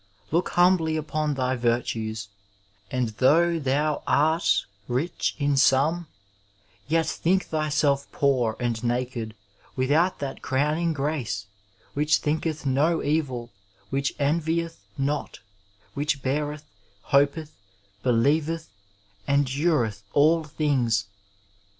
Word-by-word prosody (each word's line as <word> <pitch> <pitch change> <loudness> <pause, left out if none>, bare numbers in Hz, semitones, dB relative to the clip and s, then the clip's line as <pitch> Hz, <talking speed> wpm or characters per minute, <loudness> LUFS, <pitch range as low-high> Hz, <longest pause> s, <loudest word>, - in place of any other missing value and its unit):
Look 170 +3 +1
humbly 175 -3 +4
upon 155 -1 -1
thy 130 -1 0
virtues; 115 -3 -1 0.6
and 125 -3 -1
though 165 +9 +3
thou 145 +2 0
art 160 +3 +3 0.2
rich 130 +8 -1
in 145 -1 +1
some, 150 +6 +3 0.8
yet 160 +2 +2
think 185 +3 +1
thyself 150 -3 0
poor 125 -6 +1
and 120 -2 -2
naked 120 -2 -2 0.4
without 150 +8 +2
that 140 -2 -5
crown 150 +4 0
ing 170 -1 +1
grace, 135 -9 -2 0.5
which 150 +1 +3
thinketh 155 0 -2
no 150 +5 +2
evil, 130 -6 -1 0.4
which 135 0 -1
envieth 165 +3 0 0.2
not, 145 +2 -2 0.5
which 145 -1 -1
beareth, 150 +2 -2 0.5
hopeth, 145 +3 +2 0.5
believeth, 150 +7 +1 0.6
endureth 140 -5 +1
all 160 +3 +4
things. 135 -8 +1
145 Hz, 100 wpm, -25 LUFS, 130-155 Hz, 0.8 s, humbly